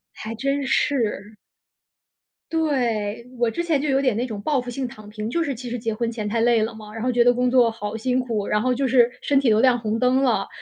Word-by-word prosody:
还 220 +1 -6
真 275 +3 -1
是。 220 -6 0 1.2
对， 235 -9 -1
我 240 -1 +2
之 285 +10 -3
前 315 -5 +1
就 300 - -1
有 270 0 +3
点 255 -5 +1
那 240 +3 -1
种 215 -4 -6
报 275 +3 0
复 245 - -8
性 255 +1 -3
躺 215 -3 -12
平， 215 +1 -5
就 340 - 0
是 280 -4 -3
其 250 +2 -8
实 245 - -3
结 225 -1 -2
婚 235 +1 -2
前 215 -3 -4
太 230 +2 0
累 235 -1 +3
了 220 +1 -2
嘛， 215 -1 -11
然 225 - -6
后 255 - +1
觉 240 -1 +4
得 245 0 +5
工 250 +1 +1
作 245 -3 +4
好 215 0 -5
辛 255 +3 0
苦， 225 -5 -2
然 210 0 +1
后 255 +1 +1
就 270 +1 0
是 245 -1 +4
身 280 -1 +3
体 270 -4 +2
都 215 0 +4
亮 255 -2 +4
红 220 0 -2
灯 255 +2 +2
了。 245 -4 +1
240 Hz, 270 characters per minute, -23 LUFS, 220-260 Hz, 1.2 s, 得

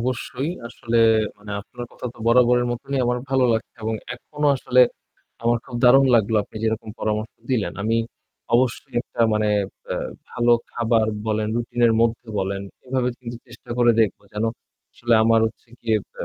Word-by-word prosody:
অবশ্যই, 130 +4 -2 0.2
আসলে 115 0 -2 0.4
মানে 105 0 -11
আপনার 120 +4 -9
কথা - - -7
তো - - -18
বরাবরের 120 +1 +4
মতনই 135 +3 -3
আমার 125 0 +1
ভালো 130 -1 +3
লাগছে 110 0 -3
এবং 110 +1 -1 0.2
এখনো 150 +4 -3
আসলে 125 -1 +3 0.6
আমার 120 0 +2
খুব 125 - -7
দারুন 135 +2 +7
লাগলো 110 -1 +3
আপনি 105 - -14
যেরকম 110 0 -1
পরামর্শ 110 0 -2 0.2
দিলেন। 120 -5 0
আমি 115 +2 +1 0.6
অবশ্যই 120 0 +1
একটা 120 - -8
মানে 105 0 +1 0.4
অ্যা - - -2 0.3
ভালো 120 0 +3 0.2
খাবার 115 -2 +2 0.2
বলেন, 110 0 0
রুটিন 120 0 -3
এর 115 - +3
মধ্যে 115 0 0
বলেন, 95 0 -2 0.2
এভাবে 130 -1 0
কিন্তু 120 -2 -7
চেষ্টা 120 -1 -15
করে 120 -1 +6
দেখবো 110 -2 +1
যেন, 105 +1 -1 0.5
আসলে 120 -1 +1
আমার 115 0 +5
হচ্ছে 110 +2 -9
গিয়ে 110 -2 +1 0.2
অ্যা - - -5
120 Hz, 165 wpm, -23 LUFS, 110-125 Hz, 0.6 s, দারুন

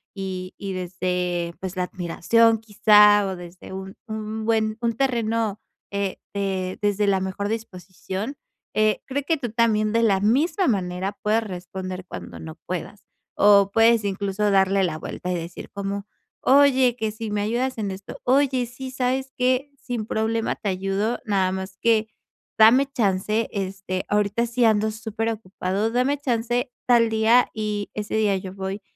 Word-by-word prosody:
y 190 -1 -5
y 195 -1 -5
desde, 180 -1 -2
pues, 190 0 -5
la 180 - +1
admiración 205 +6 +2
quizá, 210 -1 +5
o 190 - -3
desde 175 +1 -11
un 190 0 -7
un 220 0 -4
buen 220 -1 +1
un 235 -1 +1
terreno, 230 -4 0 0.3
eh, 200 -1 -1 0.2
de 190 -2 -2
desde 205 0 +1
la 195 -1 +3
mejor 190 +2 -3
disposición, 195 - -5 0.4
eh, 215 0 +2
creo 280 +1 -2
que 320 +3 +1
tú 245 -6 -4
también, 215 -2 +2
de 230 - +3
la 200 -4 +3
misma 285 - +2
manera 190 -2 -1
puedes 220 +2 +2
responder 185 -1 -6
cuando 85 - -8
no 80 0 -8
puedas, - - -5 0.3
o 200 -1 +5
puedes, 225 +1 +4
incluso, 200 +1 -1
darle 195 0 +3
la 165 -4 -1
vuelta, 180 +3 -5
y - - 0
decir 170 0 -7
como: 200 0 -4 0.4
"Oye, 265 -3 +5
que 220 -2 -1
si 220 +1 -6
me 205 0 0
ayudas 240 +5 -1
en 205 -3 -2
esto". 190 +1 -8
"Oye, 260 -1 +2
sí, 250 +2 -8
¿sabes 260 +1 -1
qué?, 255 +3 +1
sin 245 -4 -4
problema 220 +1 -1
te 205 - -3
ayudo, 195 +4 -1
nada 195 -4 +1
más 190 0 -5
que 225 -2 +3 0.5
dame 235 +5 +7
chance, 215 -1 0
este, 190 -2 -3
ahorita 210 +3 +1
sí 240 +1 0
ando 215 -1 +3
superocupado. 220 -2 -2
Dame 255 +4 +1
chance 245 -1 -1 0.2
tal 235 -2 +5
día, 225 +3 +4
y 210 -2 -2
ese 210 0 -3
día 210 -2 +2
yo 185 0 -7
voy 195 +1 -5
210 Hz, 160 wpm, -24 LUFS, 190-230 Hz, 0.5 s, dame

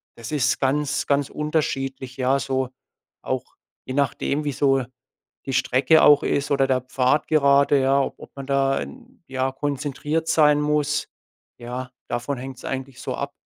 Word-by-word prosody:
das 115 +2 -8
ist 140 -3 +1
ganz, 145 +2 0
ganz 140 -1 +1
unterschiedlich, 135 -4 -2
ja? 130 +1 +2
So, 130 -2 -1 0.5
auch, - - -4 0.3
je 130 - -5
nachdem, 140 +1 0
wie 145 - -1
so 135 -1 +2 0.6
die 135 - -2
Strecke 130 +5 +4
auch 145 -1 +7
ist 140 +1 -1
oder 135 -1 +3
der 130 -1 +1
Pfad 130 +3 +1
gerade, 140 -2 +4
ja, 135 +1 +3
ob - - -3
ob - - -11
man 140 -1 -7
da 135 -1 +2
'n, 250 -3 -10
ja 130 0 -1
konzentriert 145 +3 -2
sein 150 -2 +4
muss. 150 0 0 0.5
Ja, 125 +2 -6 0.2
davon 130 +3 -3
hängt's 130 0 -8
eigentlich 135 0 -5
so 130 - -3
ab. 140 0 -4
140 Hz, 160 wpm, -23 LUFS, 130-145 Hz, 0.6 s, auch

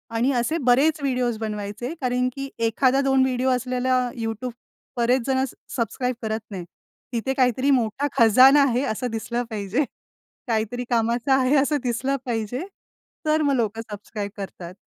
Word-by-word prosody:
आणि 245 +4 +2
असे 245 +7 0
बरेच 280 +5 +3
व्हिडिओज 250 -4 0
बनवायचे. 215 +4 -4
कारण 250 0 +1
की 275 0 -5 0.2
एखादा 260 +4 +2
दोन 270 -1 +3
व्हिडिओ 260 0 +1
असला 255 0 +1
YouTube 225 +2 -3 0.5
बरेच 245 +2 +3
जण 265 -1 +2 0.3
सबस्क्राईब 250 +1 -1
करत 220 -1 -2
नाहीत. 185 -3 -5 0.5
तिथे 240 +3 -1
काहीतरी 255 +2 +3
मोठा 250 +2 +1
खजाना 260 +5 +7
आहे 255 -1 +1
असं 250 0 -2
दिसलं 235 +2 -2
पाहिजे. 215 +5 -1 0.6
काहीतरी 225 +1 -1
कामाचं 235 +2 +1
आहे 265 +1 +3
असं 285 +2 +2
दिसलं 255 +3 0
पाहिजे. 240 - -2 0.6
तर 310 0 +2
मग 285 -2 +2
लोकं 225 -2 -1
सबस्क्राईब 205 0 -6
करतात. 185 -3 -7
250 Hz, 145 wpm, -24 LUFS, 225-265 Hz, 0.6 s, खजाना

